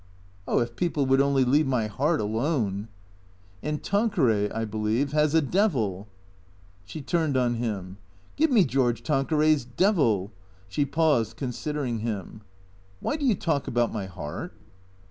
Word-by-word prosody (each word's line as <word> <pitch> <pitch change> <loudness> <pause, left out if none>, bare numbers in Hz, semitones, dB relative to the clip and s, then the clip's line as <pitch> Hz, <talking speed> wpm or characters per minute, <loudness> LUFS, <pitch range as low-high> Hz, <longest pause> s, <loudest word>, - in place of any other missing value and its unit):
" 90 0 -29
Oh, - - +1
if 120 0 0
people 165 -5 0
would 135 +1 +4
only 140 -2 +3
leave 145 +4 +3
my 125 -4 +1
heart 145 +10 0
alone! 110 -2 -1 0.3
" 90 0 -30
" 90 +1 -29
And 150 0 -3
Tanqueray, 160 - +2
I 115 0 -3
believe, 110 +6 -1
has 150 0 +2
a 160 - +4
devil." 125 - 0 0.8
She 140 +11 -8
turned 155 -2 0
on 125 -2 +2
him. 100 -6 -4 0.2
" 95 - -30
Give 315 +2 +3
me 230 -8 +5
George 125 -2 0
Tanqueray's 150 0 +2
devil! 120 - +1 0.2
" 95 0 -30
She 140 +10 0
paused, 145 -6 +1
con 130 - -3
sidering 130 -2 -3
him. 105 -2 -5 0.3
" 95 0 -30
Why - - -1
do 305 - -4
you 230 - +4
talk 160 -6 -1
about 120 0 0
my 100 -4 -3
heart 75 -5 -7
125 Hz, 170 wpm, -26 LUFS, 105-150 Hz, 0.8 s, me